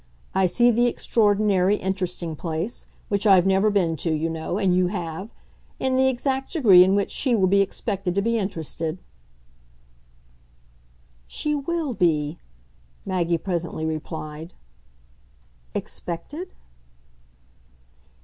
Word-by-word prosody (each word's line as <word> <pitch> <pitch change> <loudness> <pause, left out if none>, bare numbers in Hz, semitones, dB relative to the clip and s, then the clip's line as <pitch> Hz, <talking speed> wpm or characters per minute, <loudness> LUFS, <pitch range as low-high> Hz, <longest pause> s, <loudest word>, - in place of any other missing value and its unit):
I 190 -1 +3
see 240 +6 +4
the 240 +2 +3
extraordinary 205 -4 +2
'interesting' 180 -4 -3
place 165 +8 -4 0.2
which 200 +1 0
I've 190 -3 +6
never 195 +2 +3
been 180 -6 +1
to, 165 +3 -1
you 160 +1 -1
know, 160 +3 -3
and 190 -4 +2
you 180 0 +3
have 180 +1 -5 0.5
and 260 0 0
the 265 0 +4
exact 265 +2 -1
degree 205 - +7
in 190 +2 +2
which 200 -1 0
she 255 -4 +1
will 195 -4 +3
be 200 +2 +4
expected 195 -2 -2
to 200 - +2
be 230 +1 +1
interested." 165 -3 -3 2.3
"She 300 - -2
WILL 300 -1 -2
be," 155 -5 0 0.7
Maggie 175 -3 0
presently 170 -3 -3
replied. 160 +1 -5 1.2
"Expected?" 295 - -6
190 Hz, 120 wpm, -24 LUFS, 170-220 Hz, 2.3 s, degree